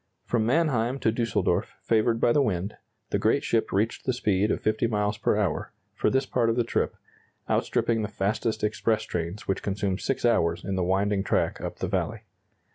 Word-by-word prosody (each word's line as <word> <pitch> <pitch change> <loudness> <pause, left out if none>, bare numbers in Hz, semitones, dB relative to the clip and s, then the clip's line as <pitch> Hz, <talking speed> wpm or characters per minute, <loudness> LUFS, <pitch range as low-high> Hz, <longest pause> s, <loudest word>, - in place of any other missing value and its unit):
From 115 -2 +1
Mannheim 130 -4 +2
to 110 - +3
Düsseldorf, 115 0 0
favored 115 +1 +2
by 120 - +4
the 145 - +4
wind, 100 -5 -1 0.4
the 100 - +1
great 110 +7 +2
ship 115 - 0
reached 105 +4 0
the 130 - +2
speed 105 -4 +1
of - - 0
50 110 +2 +1
miles 105 -1 0
per - - +2
hour, - - -1 0.2
for - - +1
this 135 +1 +1
part 120 -3 +1
of 115 - +1
the 120 - +2
trip, 115 - -1 0.5
outstripping 115 -1 +1
the 105 - -1
fastest 105 +3 -1
express 110 +1 +1
trains 85 +4 -4
which 95 - 0
consume 100 -1 -1
6 135 - -1
hours 85 -8 +2
in 95 - -2
the 95 - 0
winding 95 +2 +1
track - - 0
up - - -5
the - - -2
valley. - - -2
110 Hz, 195 wpm, -26 LUFS, 100-115 Hz, 0.5 s, by